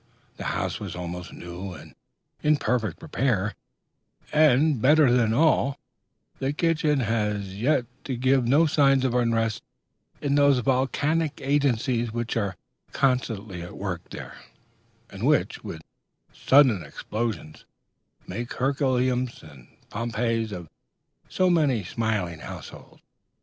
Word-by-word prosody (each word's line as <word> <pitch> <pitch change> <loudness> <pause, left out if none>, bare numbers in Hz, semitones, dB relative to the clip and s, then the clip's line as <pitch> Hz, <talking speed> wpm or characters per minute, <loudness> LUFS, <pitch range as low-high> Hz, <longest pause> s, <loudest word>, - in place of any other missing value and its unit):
The - - -6
house - - -2
was 100 -4 -6
almost 90 0 -6
new 90 +2 -7
and - - -12 0.5
in 150 0 +3
perfect 120 +1 -1
repair; 120 - 0 0.8
and, 150 -3 +4
better 150 0 +5
than 120 -3 +3
all, 140 +1 +3 0.6
the 135 +1 -1
kitchen 155 -3 +1
had 110 -2 0
as 100 -2 -6
yet 125 -1 +2 0.2
given 130 0 +1
no 145 +7 +4
signs 135 -3 +3
of 125 - +1
unrest 115 -3 +1 0.6
in 140 -1 -1
those 140 -1 +5
volcanic 140 +5 0
agencies 130 -4 +1
which 120 0 -3
are 100 -5 -1 0.4
constantly 115 -8 0
at 85 - -9
work 90 -4 -5
there, - - -9 0.7
and - - -9
which, - - +1
with 80 -1 -7 0.5
sudden 130 -8 +4
explosions, 100 0 -5 0.6
make 115 +6 -5
Herculaneums 130 -2 0
and 70 -6 -14 0.2
Pompeiis 115 0 -1
of 90 -4 -7 0.6
so 185 - +2
many 150 - +2
smiling 95 -5 -2
households. - - -10
120 Hz, 120 wpm, -25 LUFS, 105-140 Hz, 0.8 s, better